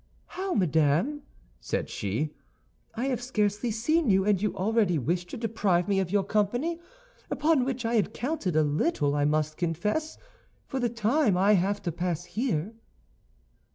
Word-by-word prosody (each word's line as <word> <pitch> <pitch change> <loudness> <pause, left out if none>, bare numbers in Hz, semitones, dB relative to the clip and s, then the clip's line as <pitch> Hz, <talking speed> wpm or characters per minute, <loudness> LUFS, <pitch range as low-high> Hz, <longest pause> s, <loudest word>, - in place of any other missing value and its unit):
"How, 375 0 -3
madame," 170 - +2 0.4
said - - -2
she, 115 +10 -3 0.6
"I 240 +3 -2
have 255 -3 -1
scarcely 215 -2 0
seen 260 +7 +1
you, 190 -1 +4
and 205 -3 +2
you 210 -3 -1
already 200 -2 +2
wish 175 +6 -1
to - - -7
deprive 205 -6 0
me 200 -1 +2
of 190 -2 -1
your 200 +1 +2
company, 240 - 0 0.5
upon 300 -4 +2
which 255 -2 -3
I 230 - 0
had 215 -2 +2
counted 240 - -2
a 155 - +4
little, 145 - +1
I 145 0 +1
must 155 +1 0
confess, 210 - -1 0.5
for 265 - -4
the 245 -1 +1
time 230 -1 +2
I 195 +3 +4
have 200 +2 +1
to 170 - -1
pass 175 0 -2
here?" 205 - -2
205 Hz, 160 wpm, -27 LUFS, 175-245 Hz, 0.6 s, you